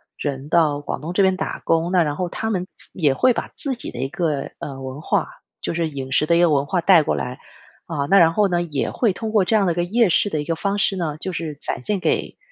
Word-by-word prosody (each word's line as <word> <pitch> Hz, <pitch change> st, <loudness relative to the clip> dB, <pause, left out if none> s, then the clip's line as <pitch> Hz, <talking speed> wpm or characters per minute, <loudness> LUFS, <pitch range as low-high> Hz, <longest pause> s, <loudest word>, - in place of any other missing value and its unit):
人 140 Hz, -1 st, -4 dB
到 150 Hz, -3 st, +2 dB
广 145 Hz, -, -5 dB
东 160 Hz, +3 st, -5 dB
这 195 Hz, +2 st, +2 dB
边 190 Hz, 0 st, +3 dB
打 -, -, -4 dB
工， 165 Hz, +1 st, +1 dB
那 180 Hz, -2 st, +4 dB
然 145 Hz, -2 st, -2 dB
后 180 Hz, +2 st, -2 dB
他 220 Hz, +4 st, -3 dB
们 185 Hz, -2 st, -2 dB
自 -, -, -12 dB
也 145 Hz, -7 st, +2 dB
会 255 Hz, -, +4 dB
把 -, -, -3 dB
自 275 Hz, -2 st, -3 dB
己 240 Hz, -, -6 dB
的 -, -, -9 dB
一 135 Hz, -, -1 dB
个， 155 Hz, -4 st, -2 dB
呃， 135 Hz, -2 st, -6 dB
文 130 Hz, +2 st, -7 dB
化 -, -, 0 dB, 0.3 s
就 -, -, -3 dB
是 165 Hz, -1 st, -1 dB
饮 135 Hz, -3 st, -6 dB
食 155 Hz, -, +2 dB
的 170 Hz, +1 st, +4 dB
一 -, -, +3 dB
个 175 Hz, -2 st, +4 dB
文 140 Hz, -1 st, +2 dB
化 180 Hz, -1 st, 0 dB
带 180 Hz, -2 st, +6 dB
过 -, -, 0 dB
来。 125 Hz, +3 st, -4 dB, 0.5 s
啊， 145 Hz, -4 st, -2 dB
那 195 Hz, -, +6 dB
然 165 Hz, -2 st, +6 dB
后 205 Hz, +4 st, +2 dB
呢， 175 Hz, -2 st, 0 dB
也 150 Hz, -5 st, -2 dB
会 230 Hz, -5 st, +1 dB
通 220 Hz, +4 st, -5 dB
过 210 Hz, -4 st, +4 dB
这 200 Hz, +5 st, +1 dB
样 200 Hz, -, +2 dB
的 170 Hz, -, +2 dB
一 -, -, -11 dB
个 175 Hz, -, +1 dB
夜 220 Hz, +4 st, +2 dB
市 205 Hz, +4 st, +3 dB
的 155 Hz, -, -2 dB
一 -, -, -6 dB
个 165 Hz, +1 st, -1 dB
方 200 Hz, +4 st, -1 dB
式 195 Hz, -1 st, +1 dB
呢， 160 Hz, -5 st, -3 dB
就 185 Hz, -, -3 dB
是 165 Hz, -3 st, -4 dB
展 135 Hz, -, -5 dB
现 205 Hz, +3 st, -1 dB
给， -, -, -1 dB
170 Hz, 305 characters per minute, -21 LUFS, 150-190 Hz, 0.5 s, 带